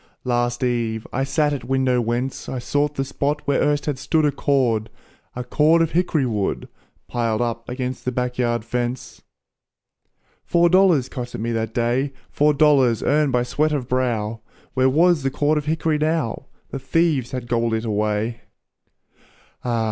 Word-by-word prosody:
Last 120 0 0
eve, 115 -3 -1
I 135 - 0
sat 145 +2 +1
at 135 -4 -4
window 130 0 +1
whence 120 +3 -3
I 130 - -3
sought 145 +4 -1
the 135 - -1
spot 145 +2 -2
where 140 -1 +1
erst 145 0 +1
had 145 -3 -2
stood 155 +2 +1
A 145 - +3
cord 125 -6 +1 0.5
a 125 - -4
cord 155 +6 +3
of 165 - -2
hick'ry 165 -5 +1
wood, 105 -5 -2 0.4
Piled 115 -2 -1
up 115 -1 -3
against 125 0 -4
the 125 - -1
back 125 0 -3
yard 120 -2 0
fence. 120 +1 -4 1.2
Four 170 0 +3
dollars 180 -8 +4
cost 125 -1 -6
me 115 +2 -2
it - - -1
that 110 0 -3
day, 125 +4 0 0.2
Four 150 0 +3
dollars 135 -6 +4
earned 150 -1 +2
by 125 -1 +2
sweat 150 +5 0
of 135 -5 -2
brow, 115 -4 -1 0.3
Where 130 0 +3
was 165 +3 +3
the 135 - 0
cord 150 +3 +1
of 150 - -8
hick'ry 160 0 0
now? 155 -5 -1 0.2
The 135 - -4
thieves 140 -2 +1
had 125 -2 -5
gobbled 115 -1 +1
it 110 +1 -3
away! 105 +2 -1 1.2
Ah! 120 -2 0
130 Hz, 170 wpm, -22 LUFS, 120-150 Hz, 1.2 s, dollars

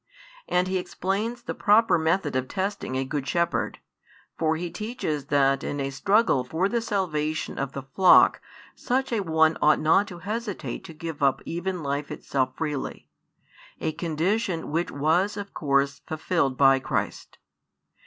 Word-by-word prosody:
And 180 +1 +1
He 185 0 0
explains 210 +7 -3
the - - -4
proper 220 +2 +4
method 160 -2 0
of 130 0 0
testing 195 -7 -3
a 135 +1 -1
good 140 0 -3
shepherd, 170 0 0 0.6
for 160 -1 +1
He 170 +1 -4
teaches 210 - -3
that 135 -1 +2
in 145 - -3
a 135 0 -2
struggle 195 - +2
for 160 +9 0
the 235 +3 -1
salvation 160 -8 -2
of 135 -1 -3
the 135 - -5
flock 180 +7 +5 0.3
such 260 0 -1
a 225 - +1
one 160 -3 +2
ought 155 0 +5
not 165 +6 +3
to 180 -5 -8
hesitate 215 -1 -4
to 165 -4 -10
give 160 -1 -6
up 135 -1 +3
even 175 0 -3
life 140 +1 -2
itself 130 -2 -2
freely, 150 -4 -4 0.7
a 160 - -1
condition 170 +3 -1
which 165 +3 0
was 175 +8 +1
of 200 0 -6
course 140 -1 +1
fulfilled 160 -4 0
by 135 -1 +6
Christ. - - -3
160 Hz, 155 wpm, -26 LUFS, 140-195 Hz, 0.7 s, by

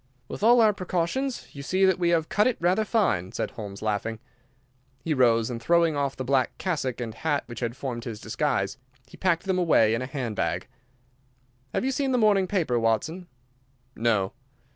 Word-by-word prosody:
"With - - -7
all 235 +2 +6
our 215 -2 +5
precautions, 190 +8 -2
you 140 - -8
see 185 +7 +2
that 190 -1 +3
we 175 -1 +2
have 165 -2 +2
cut 210 +2 +2
it 255 - 0
rather 180 +5 +2
fine," 180 - 0
said - - -3
Holmes, 100 -2 -8
laughing. 110 +1 -1 0.9
He 165 - 0
rose, 120 -3 +3
and 115 -1 -5
throwing 170 +2 +3
off 140 -1 -1
the 130 - -4
black 130 -1 +1
cassock 145 -10 -2
and 115 -2 -4
hat 145 +4 -1
which 120 - -8
had 120 0 -3
formed 125 -4 -5
his 110 -4 -6
disguise, 110 -2 -1 0.3
he - - -15
packed 175 -3 +1
them 190 -1 0
away 115 -11 +4
in 115 - -1
a 130 - -3
hand 130 -5 -4
bag. - - -2 1.0
"Have - - -1
you 265 - +1
seen 270 0 0
the - - +3
morning 205 -4 +3
paper, 165 -12 0
Watson?" 115 - -1 0.7
"No." 110 -4 +1
145 Hz, 190 wpm, -26 LUFS, 115-185 Hz, 1.0 s, all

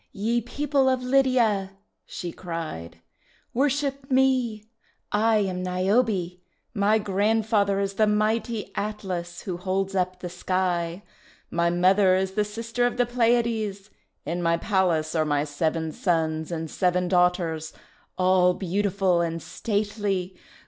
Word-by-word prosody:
"Ye 230 +3 0
people 275 +2 +1
of 260 -1 0
Lydia," 250 -7 +2 0.3
she 175 -2 -5
cried, 160 - -6 0.5
"worship 275 +1 0
me! 255 -5 +2 0.5
I 220 +1 +3
am 190 -3 -1
Niobe! 185 0 0 0.3
My 210 0 +3
grandfather 205 0 +1
is 200 0 -1
the 215 +2 +2
mighty 215 +1 0
Atlas 185 -5 -4
who 180 -3 -4
holds 190 +1 -2
up 185 -1 -1
the 180 - -5
sky. 175 0 -2 0.5
My 170 0 +2
mother 185 +2 +4
is 190 0 0
the 210 +2 +1
sister 230 +3 -1
of 245 - -4
the 245 - +3
Pleiades. 230 -4 0 0.3
In 170 +4 -2
my 170 0 +2
palace 170 -5 +1
are 160 -2 +2
my 145 -1 +1
seven 160 +2 -1
sons 160 -2 -1
and 165 -1 -3
seven 180 -1 +1
daughters, 175 -3 +1 0.5
all 185 -1 +4
beauti 195 +2 -1
ful 185 -3 +2
and 165 -1 -2
stately. 205 -3 -2
195 Hz, 130 wpm, -25 LUFS, 175-220 Hz, 0.5 s, mother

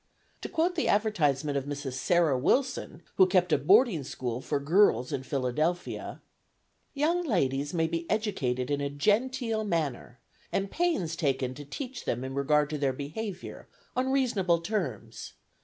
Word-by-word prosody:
To - - -5
quote 335 +3 +1
the 330 - -1
advertisement 150 -10 +1
of 135 - -8
Mrs. 145 -2 -4
Sarah 160 +2 +2
Wilson, 210 - 0
who 190 - +7
kept 180 -2 +2
a - - +5
boarding 190 - +4
school 125 -2 -4
for 145 +1 -1
girls 140 - +3
in 135 - -1
Philadelphia: 140 +7 -2 0.7
"Young 330 +5 +1
ladies 145 - 0
may 165 -2 +1
be 165 +1 -3
educated 135 - -1
in 145 0 0
a 140 - -1
genteel 220 - 0
manner, 155 - -2 0.3
and 195 0 -1
pains 320 - 0
taken 135 -5 0
to 145 +2 -9
teach 250 - -6
them 120 +2 -1
in 130 0 -5
regard 150 +2 +2
to 150 - -3
their 135 -2 +1
behaviour, 175 +8 -6 0.3
on 260 +1 +1
reasonable 195 -11 +2
terms. 185 -5 -4
165 Hz, 155 wpm, -29 LUFS, 140-215 Hz, 0.7 s, who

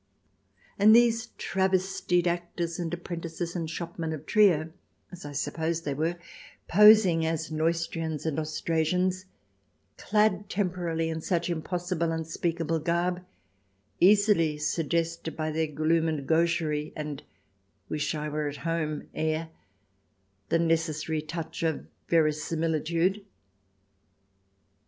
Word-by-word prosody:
And 215 +2 +7
these 230 -1 +4
travestied 190 -2 0
actors 170 -1 -2
and 170 -2 -3
apprentices 170 0 -5
and 165 -2 -3
shopmen 165 -1 -4
of 155 -1 -7
Trier, 165 -7 +3 0.4
as 180 -4 -10
I 145 - -6
suppose 160 +3 -2
they 145 - -2
were, 160 +5 -1 0.5
posing 210 -4 +7
as 160 0 -2
Neustrians 165 -1 -1
and 160 -2 -1
Austrasians, 165 +4 0 0.7
clad 210 -1 +1
temporarily 175 -5 -1
in 160 0 -4
such 175 0 -1
impossible, 175 0 -2
unspeakable 165 0 -2
garb, 175 +3 -1 0.8
easily 195 -5 +4
suggested 165 +1 -1
by 155 0 -1
their 160 +1 0
gloom 155 +2 +1
and 150 -4 -3
gaucherie 160 -2 +1
and 150 -2 -5 0.3
" 95 0 -44
wish 150 0 -2
I 150 0 -3
were 150 0 -2
at 145 0 -5
home 155 -2 -2
" - - -33
air 160 +1 -1 1.0
the - - +3
necessary 160 -2 0
touch 160 +1 -6
of 160 -2 -1 0.2
verisimilitude. 165 +4 +1
165 Hz, 115 wpm, -28 LUFS, 155-175 Hz, 1.0 s, And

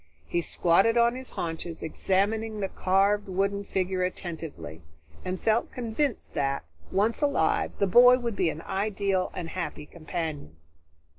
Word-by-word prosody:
He 175 - -1
squatted 185 +8 +3
on 235 0 +4
his 260 0 -7
haunches, 165 0 -5
examining 210 +6 0
the 195 -1 -1
carved 200 +2 +2
wooden 200 +2 0
figure 185 -1 -1
attentively, 165 - -5 0.4
and 185 0 -3
felt 225 +1 +1
convinced 245 +2 -2
that, 140 - -1 0.3
once 215 +7 +1
alive, 285 -1 +1
the 200 - +2
boy 245 +6 +7
would 235 -4 -3
be 170 - +2
an 160 +1 -6
ideal 195 -1 0
and 165 -2 -4
happy 170 -4 -5
companion. 155 - -5
190 Hz, 140 wpm, -27 LUFS, 170-220 Hz, 0.4 s, boy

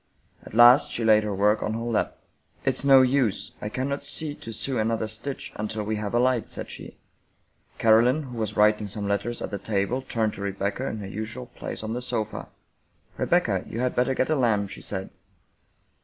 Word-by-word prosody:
At - - -11
last 120 +4 +8
she 115 - -2
laid 110 -1 +5
her 105 -2 -2
work 105 +2 +3
on 110 - -2
her - - -3
lap. 115 -2 -1 0.2
" 80 +2 -33
It's 135 0 0
no 135 -2 +7
use, 125 -5 +1
I 105 - -3
cannot 135 +5 -2
see 155 -2 -3
to 115 - -9
sew 125 +3 -2
another 110 0 0
stitch 110 +6 -5
until 110 0 -3
we 110 +1 -2
have 105 +1 -3
a - - +4
light," 125 -2 +1
said - - -5
she. - - -9 0.8
Caroline, 120 +7 +4
who 125 -3 -8
was 105 -1 -3
writing 105 0 +4
some 100 0 -4
letters 100 +4 -2
at - - -5
the 100 - -3
table, 105 +5 -1
turned 115 -4 -1
to - - -9
Rebecca, 100 +6 -2
in 110 - -3
her 100 - -6
usual 110 +5 -5
place 120 - -7
on 110 +1 -3
the 125 - -3
sofa. 115 -4 -3 0.4
" - - -36
Rebecca, - - +2
you 115 - -5
had 125 0 0
better 125 +2 +2
get 130 - 0
a - - +3
lamp," 105 -7 +1
she - - -7
said. 95 -1 -5
110 Hz, 210 wpm, -26 LUFS, 105-125 Hz, 0.8 s, last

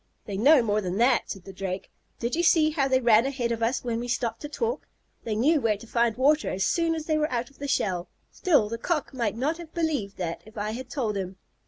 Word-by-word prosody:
"They 200 - -5
know 265 +6 +6
more 215 -1 +1
than 185 -1 -3
that," 240 +4 +3
said 195 -4 -6
the 195 - -10
Drake. 190 0 -5 0.3
"Did 235 +1 -2
you 340 - +1
see 320 -2 +4
how 285 -3 +1
they 260 -1 +3
ran 235 0 +5
ahead 255 -4 -2
of 230 -1 -2
us 235 +3 0
when 235 -2 -2
we 240 - -4
stopped 240 -1 -2
to 295 - -6
talk? 460 +10 -2 0.4
They 220 -2 -1
knew 290 +7 +3
where 220 -3 +1
to 220 - -12
find 235 -1 +1
water 295 +4 +3
as 190 0 -1
soon 330 +9 +1
as 315 -1 -5
they 310 -1 +1
were 305 +1 0
out 240 +1 -2
of 275 - -24
the 285 - -4
shell. 185 -9 0 0.2
Still, 295 - +2
the 230 +2 -5
Cock 305 +1 -1
might 230 -6 -1
not 305 +7 -1
have 335 -2 -11
believed 295 - -1
that 170 -2 -3
if 215 +1 -16
I 210 +1 -2
had 250 +3 -6
told 235 -6 -2
him." 190 -1 -4
240 Hz, 255 wpm, -26 LUFS, 210-295 Hz, 0.4 s, know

